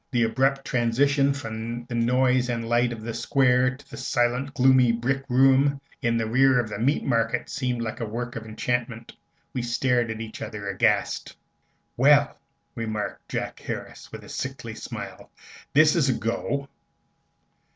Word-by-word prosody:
The 120 -3 +1
abrupt 135 +4 +1
transition 135 +4 +2
from 115 -3 -5
the 120 - -8
noise 125 +2 +2
and 115 -1 -2
light 120 +1 +2
of 115 -2 -7
the 115 0 -4
Square 125 +1 +2
to 140 0 -19
the - - -8
silent, 125 +3 0
gloomy 130 -1 +5
brick 130 +4 -1
room 135 +2 +4 0.2
in 115 0 +1
the 115 - 0
rear 130 +3 +4
of 115 -2 -2
the 100 - -5
Meat 135 +6 +1
Market 115 -1 0
seemed 125 -6 -2
like 110 - -4
the 115 - -4
work 120 +3 -5
of 115 - -5
enchantment. 115 +1 -3 0.4
We 125 - -2
stared 120 0 +1
at 110 0 -4
each 115 -1 -7
other, 105 -2 -6
aghast. 95 - 0 0.6
"Well," 145 +2 +5 0.4
remarked 110 -3 -4
Jack - - -4
Harris, - - -7
with - - -9
a - - -13
sickly - - -5
smile, - - -8 0.5
"this 155 +2 +6
is 150 -6 +2
a - - +3
go!" 140 +5 -2
120 Hz, 160 wpm, -25 LUFS, 115-135 Hz, 0.6 s, this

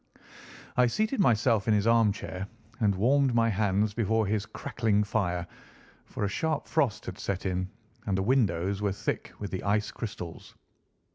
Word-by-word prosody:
I 125 0 +5
seated 215 - 0
myself 115 - +3
in 110 - +4
his 105 0 +1
armchair 105 -4 +1 0.3
and 105 -4 +2
warmed 130 +5 +3
my 115 -1 +4
hands 105 0 +1
before 110 0 +1
his 105 0 -1
crackling 105 -2 0
fire, 90 -5 -1 0.6
for 105 - -3
a - - +1
sharp 155 +8 -1
frost 140 -9 0
had - - -7
set 100 -1 -3
in, 95 0 -1 0.4
and 95 -1 +1
the 95 - 0
windows 100 -5 +1
were 100 -2 +1
thick 100 +3 -3
with 105 - -5
the 95 - -3
ice 105 +1 +1
crystals. 90 -7 -7
105 Hz, 160 wpm, -28 LUFS, 100-115 Hz, 0.6 s, I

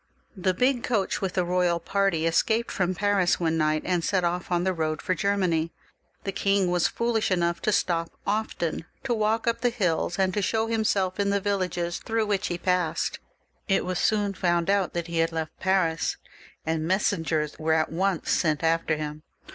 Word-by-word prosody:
The 185 -1 0
big 250 +3 +2
coach 215 -5 0
with 190 -2 -2
the 180 - +1
royal 175 -1 +1
party 185 -2 0
escaped 220 +8 +1
from 185 -1 0
Paris 200 -2 +2
one 165 -2 +1
night, 155 -1 +1
and 180 -2 0
set 185 0 +1
off 175 +1 -2
on 175 0 +2
the 190 0 +1
road 155 -2 -1
for 185 - -1
Germany. 180 -5 0 0.5
The 195 - -2
king 195 -2 +1
was 175 -1 +3
foolish 235 -2 0
enough 170 -2 0
to 215 - +1
stop 165 -4 +1 0.2
often, 200 -6 -2 0.2
to 245 - 0
walk 220 0 +1
up 235 -1 0
the 245 - +3
hills, 180 -6 0
and 190 -1 +1
to 210 - 0
show 220 +3 +1
himseK 210 -4 0
in 200 0 +2
the 200 0 +2
villages 180 -4 -1
through 225 -1 -1
which 205 -2 0
he 175 - -2
passed. 180 -3 0 0.5
It 195 - +2
was 180 -1 -2
soon 205 -2 +1
found 175 -1 +1
out 200 -2 +1
that 170 -1 -2
he 170 -1 -2
had 165 0 +2
left 160 -1 -4
Paris, 185 -4 +1 0.5
and 160 0 -1
messen 190 -1 +1
gers 155 -2 -2
were 160 0 +1
at 160 0 +1
once 185 +1 0
sent 155 -2 +1
after 165 -1 +1
him. 150 0 -5
180 Hz, 195 wpm, -26 LUFS, 165-200 Hz, 0.5 s, was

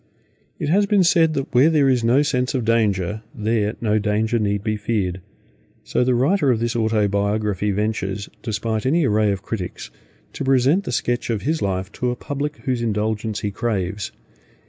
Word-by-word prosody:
It 145 - -3
has 200 +5 +3
been 200 -2 +4
said 165 -2 +3
that 135 -2 -3
where 130 +5 +6
there 150 -4 +3
is 125 -3 +2
no 125 +5 +4
sense 125 -2 0
of 125 -3 -1
danger, 105 -3 +1
there 110 -1 0
no 110 -2 +2
danger 110 +2 0
need 100 -1 -1
be 110 -1 0
feared; 105 -4 -2 0.6
so - - 0
the 125 0 +2
writer 140 +4 +2
of 120 -3 +2
this 120 0 -1
Autobiography 105 -2 0
ventures, 100 -1 -2
despite 110 +1 -2
any 160 +3 +3
array 105 -3 +2
of 100 - -4
critics, 95 -6 -5 0.4
to - - -4
present 135 +8 +3
the - - -3
sketch 120 0 -1
of 110 -4 -1
his 155 +3 0
life 95 -1 -2
to 125 - -2
a 125 - -1
public 145 +3 -4
whose 125 -3 0
indulgence 110 -1 -1
he 105 - -2
craves. 100 -2 -2
110 Hz, 180 wpm, -21 LUFS, 105-130 Hz, 0.6 s, where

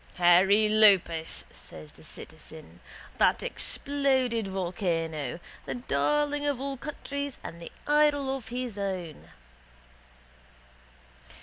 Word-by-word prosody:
—Hairy 190 +4 +5
Iopas, 195 -7 +3
says 75 -1 -12
the - - -18
citizen, 85 +2 -11 0.4
that - - +3
exploded 260 -6 0
volcano, 170 - -2 0.3
the - - -3
darling 290 - 0
of 280 -3 0
all 275 0 -3
countries 280 0 -5
and 170 +1 -8
the 170 - -8
idol 290 -2 +3
of 260 -4 -8
his 245 -4 -4
own. 185 -6 -5
215 Hz, 100 wpm, -28 LUFS, 175-275 Hz, 0.4 s, Hairy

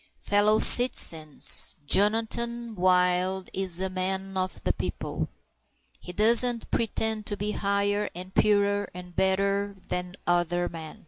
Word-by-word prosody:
Fellow 205 +1 +1
citizens, 160 - +5
Jonathan 230 +5 +1
Wild 180 0 0
is 185 -2 -3
a 190 - -1
man 190 +1 -4
of 185 0 -4
the - - -1
people. - - -6 0.7
He 180 - -10
doesn't 230 +4 +1
pretend 220 -1 -2
to 205 - -4
be 205 +1 -4
higher 200 0 -2
and 185 +2 -10
purer 205 -1 0
and 180 -1 -12
better 200 +1 -1
than 180 0 -5
other 175 0 -1
men. 160 -2 -10
195 Hz, 125 wpm, -25 LUFS, 180-210 Hz, 0.7 s, citizens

